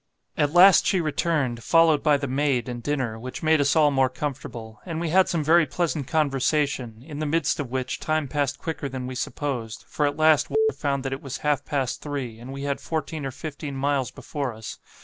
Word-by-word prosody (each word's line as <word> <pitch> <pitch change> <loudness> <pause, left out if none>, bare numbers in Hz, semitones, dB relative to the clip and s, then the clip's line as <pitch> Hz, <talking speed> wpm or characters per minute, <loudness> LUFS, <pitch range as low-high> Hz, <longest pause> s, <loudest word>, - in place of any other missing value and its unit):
At 145 -1 +1
last 180 +3 +7
she 190 - +2
returned, 150 -7 -1
followed 165 -2 +4
by 150 -2 +4
the 140 0 -3
maid 135 -2 0
and 120 -1 -5
dinner, 130 -5 -2
which 130 +6 -7
made 160 -1 +4
us 140 0 +2
all 150 -2 +5
more 135 -2 +3
comfortable; 125 -5 -6
and 165 -3 -4
we 170 -1 -2
had 185 +3 +4
some 165 -3 0
very 165 +1 +4
pleasant 155 -2 -2
conversation, 140 -5 0
in 150 -2 -7
the 155 - -1
midst 160 0 +1
of 140 -4 -3
which 130 0 -3
time 155 -2 -1
passed 140 0 -1
quicker 155 -3 -4
than 130 -1 -5
we 130 - -5
supposed, 125 -3 -4
for 150 - 0
at 145 - -3
last 155 -1 +5
W - - -6 0.2
found 140 -2 -1
that 135 - -1
it 135 - -5
was 135 -1 -5
half 145 -1 +2
past 135 -3 -2
three, 135 -6 -5
and 125 +3 -9
we 140 +1 -6
had 140 -1 -2
fourteen 155 -2 -3
or - - -5
fifteen 145 0 -6
miles 135 -1 0
before 140 -6 -5
us. 110 -1 -8
145 Hz, 215 wpm, -25 LUFS, 130-155 Hz, 0.2 s, last